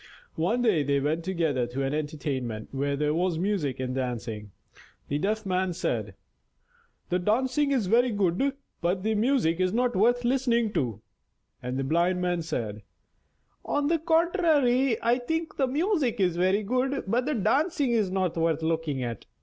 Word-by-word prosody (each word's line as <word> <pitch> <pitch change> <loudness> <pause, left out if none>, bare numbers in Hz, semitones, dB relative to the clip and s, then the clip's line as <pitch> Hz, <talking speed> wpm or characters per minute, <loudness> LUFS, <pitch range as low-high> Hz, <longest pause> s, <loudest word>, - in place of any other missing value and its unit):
One 220 +10 0
day 205 -10 +3
they 140 0 +1
went 155 +4 -1
together 160 -9 0
to 130 +3 -3
an 135 +1 -1
entertainment 140 -7 -3
where 140 +1 -1
there 150 +1 0
was 175 0 0
music 175 -8 -1
and 130 -1 -2
dancing. 120 -5 -4 0.6
The 145 - 0
Deaf 215 +5 -1
Man 185 -1 0
said: 105 - -2 0.9
"The 180 - +1
dancing 255 +9 +1
is 255 -7 +1
very 240 +6 +3
good, 205 +6 +1 0.3
but 180 +2 0
the 220 +1 +1
music 215 -7 +1
is 185 0 +2
not 245 +2 +1
worth 240 +5 +3
listening 240 -4 +1
to"; 115 -6 -2 0.6
and 125 +1 -3
the 135 - -1
Blind 170 +6 +1
Man 180 -1 0
said: 115 -10 -4 0.8
"On 290 0 0
the 330 0 +2
contrary, 315 - +2
I 240 +2 +3
think 320 +6 -3
the 270 - +2
music 290 - 0
very 185 +2 +2
good, 255 +5 0
but 240 +6 0
the 300 - 0
dancing 275 - +1
is 220 -5 +2
not 185 -2 -1
worth 165 -1 0
looking 160 -5 -1
at." 115 -3 -5
185 Hz, 165 wpm, -27 LUFS, 150-245 Hz, 0.9 s, day